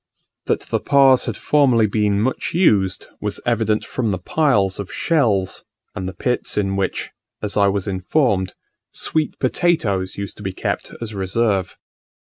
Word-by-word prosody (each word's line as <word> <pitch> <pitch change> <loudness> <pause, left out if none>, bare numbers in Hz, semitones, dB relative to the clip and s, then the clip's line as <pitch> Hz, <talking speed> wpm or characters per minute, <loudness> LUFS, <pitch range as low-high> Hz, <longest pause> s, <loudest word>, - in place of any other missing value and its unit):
That - - +1
the - - -2
Pas 135 -2 +4
had - - -3
formerly 130 -7 +3
been 105 -1 +1
much 130 +7 -1
used, 100 - +3 0.2
was 105 -1 -2
evident 110 -2 +1
from 120 -4 -2
the 95 - 0
piles 100 - +1
of 100 - -5
shells, 110 - +1 0.3
and 95 0 -4
the 95 - -10
pits 125 +7 -2
in 95 -2 0
which, 95 -1 -2 0.3
as 105 - -2
I 100 -1 +4
was 100 0 -1
informed, 95 0 0 0.4
sweet 155 -2 -1
potatoes 120 - 0
used 100 0 -6
to 105 - -10
be 95 -2 -3
kept - - -3
as 115 -2 -5
a 105 - -7
reserve. 95 0 0
105 Hz, 160 wpm, -20 LUFS, 95-125 Hz, 0.4 s, Pas